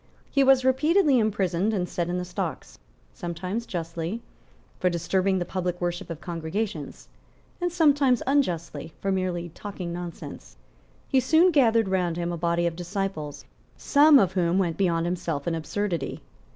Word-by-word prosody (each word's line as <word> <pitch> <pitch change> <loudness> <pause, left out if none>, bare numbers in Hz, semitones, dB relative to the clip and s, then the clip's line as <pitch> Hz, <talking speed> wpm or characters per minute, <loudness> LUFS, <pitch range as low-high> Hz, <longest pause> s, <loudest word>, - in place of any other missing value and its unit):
He 275 - +4
was 265 -1 +5
repeatedly 290 +2 +4
imprisoned 205 -1 +1
and 180 -2 -1
set 175 -1 -2
in 180 - -1
the 180 - -3
stocks, 180 -2 -5 0.3
sometimes 180 +7 -4
justly, 170 +5 -4 0.6
for 180 - +2
disturbing 190 +3 +1
the 175 - -1
public 180 -1 -3
worship 175 0 -3
of 165 -2 -5
congregations, 165 -1 -4 0.5
and 355 0 0
sometimes 290 -7 +3
unjustly, 170 - -1
for 195 - -1
merely 180 -2 -1
talking 180 0 -6
nonsense. 170 - -8 0.5
He 265 - +3
soon 320 +8 +4
gathered 230 - +4
round 180 -3 0
him 175 0 -2
a - - -2
body 170 +1 +1
of 170 -1 -1
disciples, 175 -4 -4 0.3
some 295 +1 +6
of 195 -7 +3
whom 180 -1 +1
went 175 -4 +1
beyond 170 -4 +1
himself 170 -4 -3
in 170 - +1
absurdity. 170 -1 -3
180 Hz, 150 wpm, -26 LUFS, 170-225 Hz, 0.6 s, some